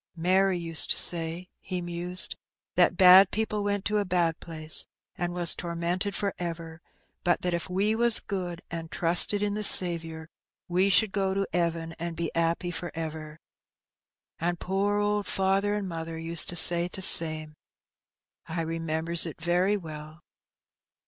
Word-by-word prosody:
"Mary 185 +2 +1
used 165 -2 +3
to - - 0
say," 170 +1 0
he 185 -1 -6
mused, 175 +1 0 0.4
"that - - +2
bad 185 0 +7
people 215 -1 -3
went 205 -1 -3
to 210 0 -1
a - - -1
bad 175 -3 -1
place 155 -2 -3 0.3
an' 175 0 -4
was 175 -1 +1
tormented 175 +3 -4
for 200 -1 -3
ever; 165 -1 -7 0.4
but 175 -1 0
that 180 -1 -1
if 170 +2 -4
we 200 +4 -1
was 235 0 +3
good, 180 -3 -6
an' 165 -1 -6
trusted 175 +5 +4
in 205 -1 -2
the 210 +1 -4
Saviour, 165 -4 +4 0.4
we 185 +3 0
should 200 +2 +2
go 195 -1 -2
to 195 0 -1
'eaven 170 -1 -2
an' 170 0 -6
be 165 -1 -4
^appy 170 +2 -2
for 175 - -6
ever. 160 -1 -8 1.0
And 175 +1 -3
poor 200 +2 -2
owd 205 0 -2
father 195 +2 -1
and 205 -2 -5
mother 165 -1 -7
used 165 0 +2
to 175 - -6
say 175 0 +5
t' 190 - -7
same. 155 -3 +2 0.9
I 165 +1 -4
remembers 165 +1 0
it 165 - -10
very 180 +5 0
well 155 -2 -11
175 Hz, 160 wpm, -26 LUFS, 165-195 Hz, 1.0 s, bad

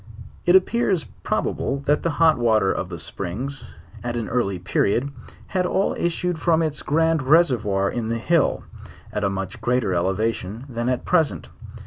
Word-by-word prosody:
It 175 - +6
appears 190 -3 +3 0.2
probable 140 0 -1
that 145 +1 +2
the 170 - 0
hot 160 -5 +4
water 110 -5 +3
of 95 - -3
the 85 - -6
springs, 115 - -4 0.4
at 120 0 -3
an 115 - -3
early 115 -6 0
period, 105 +8 0 0.4
had 180 -1 0
all 190 +2 +1
issued 175 0 -1
from, 165 -1 +2
its 155 -2 -2
grand 160 +1 +2
reservoir 125 - +3
in 115 +1 -3
the 115 - 0
hill, 165 +7 +1 0.5
at 105 - -2
a 100 - +2
much 95 0 -5
greater 120 -6 +1
elevation 100 +5 -1
than 120 -1 -2
at 125 - -1
present. 165 -5 +1
125 Hz, 160 wpm, -23 LUFS, 105-160 Hz, 0.5 s, It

